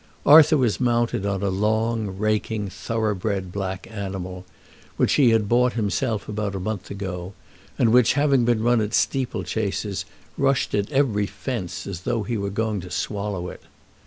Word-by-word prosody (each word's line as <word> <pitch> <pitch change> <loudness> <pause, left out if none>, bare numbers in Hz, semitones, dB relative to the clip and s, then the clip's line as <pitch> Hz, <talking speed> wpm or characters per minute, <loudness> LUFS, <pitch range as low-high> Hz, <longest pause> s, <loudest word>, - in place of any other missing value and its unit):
Arthur 155 +1 +8
was 120 -6 +1
mounted 120 -3 +1
on 100 0 -2
a 100 - +1
long, 110 0 0
raking 110 0 -1
thorough 110 +3 -2
bred 95 -2 -3
black 95 -1 -4
animal, 95 -3 -5 0.5
which - - +2
he 135 -5 +5
had 110 -2 +2
bought 125 +2 +3
himself 110 0 -1
about 105 -1 -3
a - - -2
month 100 0 -4
ago, 95 -2 -5 0.4
and 115 -1 +3
which, 125 -2 +5
having 140 -3 +3
been 115 -2 +1
run 120 -1 +3
at 105 +2 -1
steeplechases, 110 -6 -1 0.3
rushed 135 -1 +1
at 100 +3 0
every 120 -8 +2
fence 115 -9 -5
as 95 -3 -6
though 115 +2 -1
he 115 +4 -3
were 100 -2 -2
going 105 0 -1
to 90 - -9
swallow 100 0 -3
it. - - -11
105 Hz, 165 wpm, -23 LUFS, 100-120 Hz, 0.5 s, Arthur